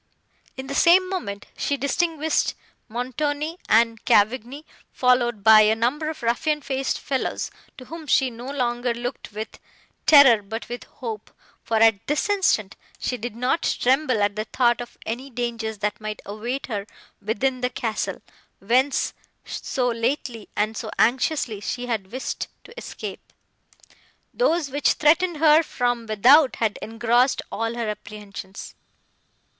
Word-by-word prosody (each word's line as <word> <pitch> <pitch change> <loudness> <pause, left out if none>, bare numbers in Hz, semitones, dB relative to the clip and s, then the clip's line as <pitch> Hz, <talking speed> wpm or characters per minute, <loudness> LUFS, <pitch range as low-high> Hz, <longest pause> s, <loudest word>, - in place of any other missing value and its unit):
In 265 - -5
the 275 - -5
same 360 +5 +5
moment, 200 - -4
she 285 - -1
distinguished 315 +3 0 0.3
Montoni 290 +7 -3
and 230 0 +3
Cavigni, 245 +7 +2 0.3
followed 240 -4 +2
by 220 0 +8
a 215 +1 +4
number 270 +8 0
of 315 - -7
ruffian 295 +6 0
faced 270 0 -1
fellows, 265 -2 -2 0.3
to 255 - -10
whom 320 +2 -9
she 265 -2 +3
no 240 +3 -8
longer 245 -3 -1
looked 245 0 -6
with 215 +2 -7 0.5
terror, 270 -8 +8
but 220 +3 -6
with 245 0 -6
hope, 225 -4 -7 0.3
for, 225 - 0
at 220 -2 +4
this 300 +8 0
instant, 355 - +1 0.2
she 250 - -2
did 240 -1 -6
not 250 +7 0 0.2
tremble 255 -4 +2
at 205 0 0
the 215 0 -3
thought 240 +1 +2
of 240 - -10
any 250 +5 -4
dangers, 230 -3 -3
that 210 +1 -3
might 215 -1 -5
await 235 +6 -4
her 205 -4 -4 0.3
within 250 +5 -1
the 250 - +1
castle, 230 -3 -3 0.3
whence 255 +7 +1 0.3
so 250 -2 -2
lately, 235 -1 -2
and 215 +1 0
so 220 - -5
anxiously 250 -2 +1
she 245 +4 -3
had 215 -5 -3
wished 260 +2 -4 0.2
to 470 - -15
escape. - - -7 1.1
Those, 335 - +1
which 290 +1 +2
threatened 330 +3 +3
her 310 +1 +6
from 245 -6 -2
without, 255 +7 +5
had 220 -3 -1
engrossed 240 +3 +1
all 225 +1 -2
her 235 -2 -2
apprehensions. 205 -2 -8
245 Hz, 145 wpm, -23 LUFS, 220-280 Hz, 1.1 s, by